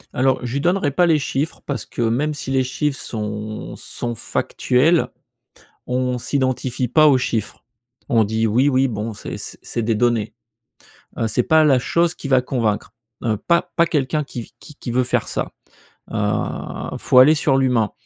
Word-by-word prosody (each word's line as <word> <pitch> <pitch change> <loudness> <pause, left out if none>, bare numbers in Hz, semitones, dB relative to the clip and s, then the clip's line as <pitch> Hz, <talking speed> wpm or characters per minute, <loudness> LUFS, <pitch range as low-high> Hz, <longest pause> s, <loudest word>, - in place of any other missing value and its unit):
Alors, 130 +1 +2
je 120 - -4
lui 140 - -1
donnerai 175 -4 +1
pas 175 +5 +3
les 160 -2 +4
chiffres 145 +3 -2
parce 135 -6 -3
que - - -5
même 130 +7 +1
si 135 - -5
les 130 -1 +2
chiffres 135 +2 -2
sont 105 -1 -5
sont 120 -1 -5
factuels, 145 +8 +1 0.8
on 125 0 -1
s'identifie 130 -1 -1
pas 155 +5 +5
aux 140 -3 +6
chiffres. 110 -4 -3 0.5
On 115 -2 +5
dit: 110 +2 0
«Oui, 125 +6 +3
oui, 135 0 +3
bon, 110 -1 -4
c'est 105 - -7
c - - -8
c'est 115 - -3
des 115 +1 +1
données», 120 -1 +1 0.9
heu, 115 - +1
c'est 110 +3 +1
pas 160 0 +5
la 140 -4 +5
chose 170 +6 +1
qui 140 - -7
va 130 -2 +4
convaincre, 115 -5 -1 0.3
heu, 110 -3 0
pas 170 - +1
pas 170 0 +4
quelqu'un 150 -1 0
qui 120 -4 -8
qui 150 - -13
qui 125 - -7
veut 125 +2 +2
faire 125 - 0
ça, - - -3 0.6
heu, 105 -1 -2
faut 125 - +4
aller 145 +5 +7
sur 145 -3 +2
l'humain 125 -6 +2
130 Hz, 180 wpm, -21 LUFS, 115-145 Hz, 0.9 s, aller